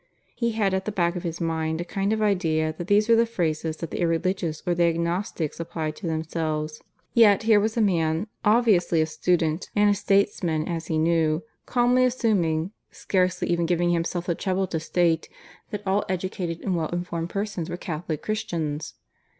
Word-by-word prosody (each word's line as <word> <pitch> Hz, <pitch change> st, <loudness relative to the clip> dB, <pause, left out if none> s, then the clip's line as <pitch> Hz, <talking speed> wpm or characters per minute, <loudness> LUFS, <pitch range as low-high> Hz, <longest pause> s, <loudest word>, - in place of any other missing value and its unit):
He 235 Hz, -2 st, -1 dB
had 205 Hz, -3 st, +1 dB
at 190 Hz, 0 st, -1 dB
the 215 Hz, -, -2 dB
back 175 Hz, -3 st, 0 dB
of 180 Hz, -, -3 dB
his 170 Hz, -1 st, -4 dB
mind 160 Hz, -1 st, -1 dB
a 175 Hz, -, -3 dB
kind 195 Hz, +2 st, -1 dB
of 220 Hz, 0 st, +1 dB
idea 160 Hz, -6 st, +1 dB
that 175 Hz, -, -4 dB
these 210 Hz, +2 st, +4 dB
were 230 Hz, -, +6 dB
the 230 Hz, +1 st, +3 dB
phrases 160 Hz, -6 st, -2 dB
that 165 Hz, 0 st, -6 dB
the -, -, -3 dB
irreligious 165 Hz, -1 st, 0 dB
or 175 Hz, -, +2 dB
the 170 Hz, 0 st, +3 dB
agnostics 170 Hz, -1 st, -1 dB
applied 160 Hz, -2 st, -3 dB
to 180 Hz, -, -5 dB
themselves; 155 Hz, -1 st, -2 dB, 0.3 s
yet 220 Hz, -3 st, +6 dB
here 220 Hz, -2 st, +5 dB
was 220 Hz, +3 st, -1 dB
a -, -, +3 dB
man, 165 Hz, -3 st, +1 dB, 0.2 s
obviously 210 Hz, -7 st, +3 dB
a 155 Hz, -, +3 dB
student, 160 Hz, +1 st, 0 dB
and 205 Hz, 0 st, +5 dB
a -, -, +4 dB
statesman 185 Hz, -6 st, +1 dB
as 165 Hz, -2 st, -3 dB
he 160 Hz, -, 0 dB
knew, 160 Hz, 0 st, +2 dB, 0.2 s
calmly 250 Hz, +1 st, +3 dB
assuming 195 Hz, -9 st, +1 dB, 0.2 s
(scarcely 185 Hz, -1 st, 0 dB
even 170 Hz, -1 st, +1 dB
giving 175 Hz, 0 st, +2 dB
himself 170 Hz, +1 st, -1 dB
the 175 Hz, -, +1 dB
trouble 190 Hz, +2 st, -1 dB
to 165 Hz, -3 st, -3 dB
state) 165 Hz, 0 st, +1 dB, 0.4 s
that 210 Hz, -1 st, -5 dB
all 195 Hz, +2 st, +2 dB
educated 185 Hz, -2 st, -3 dB
and 190 Hz, -3 st, -1 dB
well 160 Hz, -2 st, 0 dB
informed 175 Hz, -1 st, -3 dB
persons 200 Hz, -4 st, -3 dB
were 175 Hz, -, -4 dB
Catholic 160 Hz, -3 st, -4 dB
Christians! 165 Hz, -9 st, -3 dB
175 Hz, 185 wpm, -25 LUFS, 160-200 Hz, 0.4 s, were